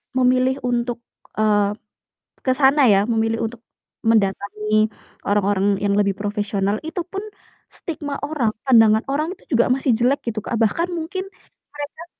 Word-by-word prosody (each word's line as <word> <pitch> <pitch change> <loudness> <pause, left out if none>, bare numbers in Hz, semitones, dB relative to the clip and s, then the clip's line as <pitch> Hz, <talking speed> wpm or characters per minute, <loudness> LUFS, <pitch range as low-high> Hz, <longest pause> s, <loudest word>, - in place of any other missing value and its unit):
memilih 255 0 +3
untuk, 240 -1 -1 0.3
eee, 210 -1 +2 0.7
ke 260 - 0
sana 270 -1 +4
ya, 200 +1 +4
memilih 225 -1 0
untuk 230 +1 -10 0.4
mendatangi 215 0 +1 0.4
orang-orang 200 -1 +2
yang 200 -1 +1
lebih 200 -1 +2
profesional, 205 -1 -1
itu 325 +3 -4
pun 390 +2 -5 0.4
stigma 295 -3 -6
orang, 285 -7 -1
pandangan 225 -4 +5
orang 305 +6 -1
itu - - -27
juga 235 - +4
masih 265 0 -1
jelek 255 +4 +2
gitu, 215 - -5
Kak, - - -2
bahkan 280 +11 +1
mungkin 370 +4 -4 0.5
mereka 295 +3 -7
230 Hz, 140 wpm, -21 LUFS, 210-280 Hz, 0.7 s, pandangan